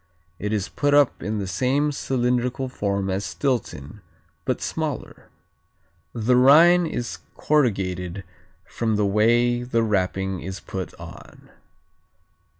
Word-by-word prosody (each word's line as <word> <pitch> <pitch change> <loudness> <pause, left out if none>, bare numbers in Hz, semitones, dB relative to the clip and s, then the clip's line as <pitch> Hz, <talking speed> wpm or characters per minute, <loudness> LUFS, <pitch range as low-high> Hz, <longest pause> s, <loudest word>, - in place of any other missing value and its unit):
It 105 - -3
is 105 -2 -1
put 145 +1 +1
up 145 -3 +3
in 105 +4 -3
the 100 - -3
same 130 - 0
cylindrical 125 -1 -1
form 100 -5 -2
as 95 +1 -2
Stilton, 105 - -3 0.4
but - - -1
smaller. - - -5 0.8
The 120 +2 +1
rind 165 +7 +6
is 120 -5 -4 0.2
corrugated 95 - 0 0.4
from 110 -2 -2
the 105 0 +1
way 120 +4 +2
the 120 -2 0
wrapping 95 -3 -1
is 95 +4 -6
put 95 -2 -6
on. - - -13
115 Hz, 120 wpm, -23 LUFS, 100-130 Hz, 0.8 s, rind